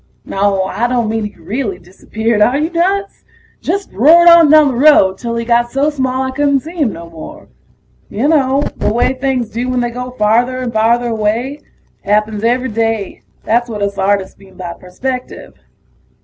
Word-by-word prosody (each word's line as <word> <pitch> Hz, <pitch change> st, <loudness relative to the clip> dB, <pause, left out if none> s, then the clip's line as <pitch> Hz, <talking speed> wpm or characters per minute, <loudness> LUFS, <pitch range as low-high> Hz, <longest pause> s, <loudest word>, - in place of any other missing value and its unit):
Naw, 195 Hz, -1 st, 0 dB
I 205 Hz, +5 st, -1 dB
don't 240 Hz, -3 st, -1 dB
mean 220 Hz, -1 st, -2 dB
he 210 Hz, -, -8 dB
really 215 Hz, -5 st, -4 dB
disappeared 210 Hz, +5 st, -3 dB
are 245 Hz, +6 st, +3 dB
you 310 Hz, +3 st, -1 dB
nuts? 390 Hz, +4 st, -1 dB, 0.4 s
Just 390 Hz, +3 st, -3 dB
roared 320 Hz, -, +5 dB
on 335 Hz, -3 st, +7 dB
down 305 Hz, -1 st, +6 dB
the -, -, -2 dB
road 240 Hz, -8 st, +4 dB
till 235 Hz, -1 st, -4 dB
he 230 Hz, 0 st, -3 dB
got 240 Hz, 0 st, +2 dB
so 280 Hz, +3 st, +1 dB
small 260 Hz, -2 st, -2 dB
I 260 Hz, -, -3 dB
couldn't 280 Hz, 0 st, +1 dB
see 320 Hz, +4 st, -10 dB
him 280 Hz, -9 st, +1 dB
no 170 Hz, 0 st, -9 dB
more. 165 Hz, -1 st, -11 dB, 0.6 s
You 230 Hz, +8 st, -1 dB
know 280 Hz, -3 st, +2 dB
the -, -, 0 dB
way 240 Hz, +3 st, +1 dB
things 255 Hz, -3 st, -2 dB
do 245 Hz, +3 st, -3 dB
when 255 Hz, 0 st, 0 dB
they 240 Hz, 0 st, -2 dB
go 250 Hz, +1 st, -6 dB
farther 245 Hz, +2 st, +1 dB
and 250 Hz, -2 st, -4 dB
farther 235 Hz, +2 st, +1 dB
away. 230 Hz, +6 st, -2 dB, 0.4 s
Happens 210 Hz, +1 st, 0 dB
every 250 Hz, +3 st, +1 dB
day; 225 Hz, -2 st, -2 dB, 0.2 s
that's 240 Hz, +2 st, 0 dB
what 210 Hz, -2 st, -4 dB
us 200 Hz, 0 st, -3 dB
artists 195 Hz, 0 st, -1 dB
mean 190 Hz, -1 st, -18 dB
by 175 Hz, -2 st, -6 dB
perspective. 250 Hz, +9 st, -6 dB
240 Hz, 185 wpm, -15 LUFS, 210-265 Hz, 0.6 s, on